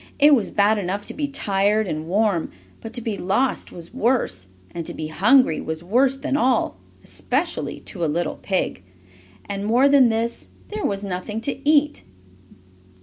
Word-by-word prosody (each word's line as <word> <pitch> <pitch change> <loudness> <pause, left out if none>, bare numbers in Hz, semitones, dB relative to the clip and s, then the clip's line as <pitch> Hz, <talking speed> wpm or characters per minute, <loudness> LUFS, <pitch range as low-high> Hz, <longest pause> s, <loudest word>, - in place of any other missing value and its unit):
It 295 +1 +6
was 230 -7 +2
bad 210 +1 +3
enough 200 +2 -3
to - - -2
be 295 -1 -2
tired 210 -5 +1
and 155 -1 -4
warm, 200 -2 +1 0.3
but 225 - -7
to 245 - -3
be 220 -3 -3
lost 245 +8 0
was 170 +3 -10
worse, 235 - 0 0.2
and 170 - -5
to - - -5
be 155 -1 -5
hungry 205 - +4
was 160 +1 -5
worse 255 +8 +2
than 270 - -2
all 260 -3 +1 0.3
especially - - -2
to 180 -5 -6
a - - +2
little 165 +2 -1
pig. 190 - -1 0.6
And, 200 0 -4
more 240 +6 +4
than 275 -3 +6
this, 230 +1 -2 0.2
there 425 -1 -3
was 200 0 -3
nothing 200 +3 -4
to 275 +3 -2
eat. 295 -1 +3
215 Hz, 170 wpm, -22 LUFS, 185-260 Hz, 0.6 s, It